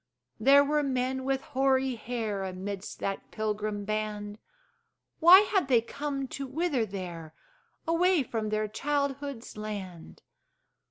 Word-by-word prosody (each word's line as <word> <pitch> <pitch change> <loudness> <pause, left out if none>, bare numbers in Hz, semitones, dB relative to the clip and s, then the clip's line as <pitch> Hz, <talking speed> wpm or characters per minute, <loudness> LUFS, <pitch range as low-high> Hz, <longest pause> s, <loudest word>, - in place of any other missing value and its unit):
There 275 +5 +7
were 300 +1 +1
men 260 -1 -1
with 270 0 0
hoary 270 -3 +1
hair 220 -3 -3
Amidst 190 +1 -5
that 195 0 -3
pilgrim 210 -1 -3
band: 210 0 -3 0.8
Why 355 +4 +9
had 395 -6 +1
they 250 -4 +5
come 275 +3 -4
to 275 +1 -5
wither 275 -4 0
there, 175 -5 -7 0.5
Away 340 -1 +3
from 225 -3 -3
their 215 0 0
childhood's 280 0 -3
land? 200 -5 -7
245 Hz, 120 wpm, -29 LUFS, 210-280 Hz, 0.8 s, Why